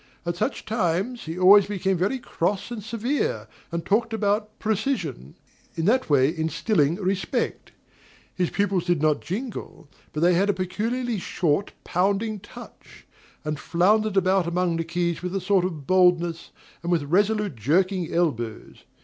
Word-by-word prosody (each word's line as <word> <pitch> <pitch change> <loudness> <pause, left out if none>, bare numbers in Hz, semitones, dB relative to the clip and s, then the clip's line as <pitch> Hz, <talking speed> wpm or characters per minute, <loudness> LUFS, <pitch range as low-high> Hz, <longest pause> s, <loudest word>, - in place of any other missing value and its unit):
At 170 0 -1
such - - -2
times 215 +3 -1
he 160 +2 -5
always 195 +2 +7
became 195 -1 0
very 190 +9 0
cross 200 -2 -2
and 225 -4 -5
severe, 235 +6 -2 0.2
and 170 0 -3
talked 225 +2 +1
about 210 0 -1
"precision;" 210 - -2 0.4
in 165 - -1
that 255 +2 +2
way 145 +2 +3
instilling 160 0 +1
respect. 190 0 -2 0.6
His 180 -2 0
pupils 195 -3 0
did 175 -3 +1
not 155 0 +2
jingle, 215 - -6 0.2
but 150 - -4
they 175 +1 +5
had 195 +4 +2
a - - +4
peculiarly 220 +5 -2
short, 175 +1 -1
pounding 200 +4 0
touch; 205 - -14 0.4
and 150 -1 -2
floundered 205 +5 +2
about 190 -1 +3
among 175 -1 0
the 165 - -1
keys 170 0 -2
with 180 +1 -4
a - - +1
sort 190 0 +2
of 160 -6 -5
boldness, 175 -2 +2 0.3
and 170 +2 -3
with 165 -4 +2
resolute, 205 +3 +1
jerking 175 - +1
elbows. 120 -10 -2
185 Hz, 150 wpm, -25 LUFS, 170-210 Hz, 0.6 s, always